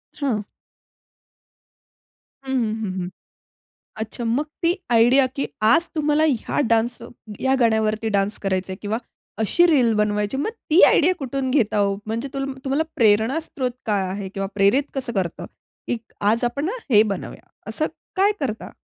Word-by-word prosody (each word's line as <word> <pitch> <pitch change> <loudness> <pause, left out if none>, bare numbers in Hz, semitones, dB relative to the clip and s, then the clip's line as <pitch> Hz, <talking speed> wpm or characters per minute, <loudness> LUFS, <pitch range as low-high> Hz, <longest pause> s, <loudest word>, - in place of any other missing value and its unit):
हां. 230 -8 -1 2.0
हं, 265 - -3
हं, 225 -4 0
हं, 190 -2 -3
हं. 180 - -4 0.9
अच्छा, 220 +2 -5
मग 235 +6 +1 0.2
ती 335 +1 +3 0.2
आयडिया 245 +3 +5
की 275 - -1 0.2
आज 285 +11 +4
तुम्हाला 305 0 +2
ह्या 250 -6 -1
डान्स 230 +2 +1 0.4
या 265 0 +2
गाण्यावरती 220 -1 +2
डान्स 200 +2 0
करायचंय 190 -1 -2
किंवा 215 +2 -1 0.4
अशी 220 - +4
रील 260 -9 +4
बनवायची, 210 +2 0
मग 285 +11 -1 0.2
ती 330 - +6
आयडिया 355 +4 +4
कुठून 270 -1 -2
घेता 245 -7 +2
हो? 200 -1 +2
म्हणजे 230 +5 -3
तु 275 - -2 0.2
तुम्हाला 275 +3 +1
प्रेरणास्रोत 250 +5 +2 0.2
काय 205 -3 +1
आहे, 195 +1 -4
किंवा 195 0 -4
प्रेरित 205 +7 +4
कसं 260 -3 -3
करतं, 185 -5 -3 0.4
की 245 - 0 0.4
आज 230 +2 0
आपण 240 +4 -1
ना 355 - -1 0.2
हे 210 -2 +7
बनवूया? 200 -4 -5 0.2
असं 220 +8 0 0.3
काय 395 +2 +4
करता? 225 -6 -3
230 Hz, 150 wpm, -22 LUFS, 210-275 Hz, 2.0 s, हे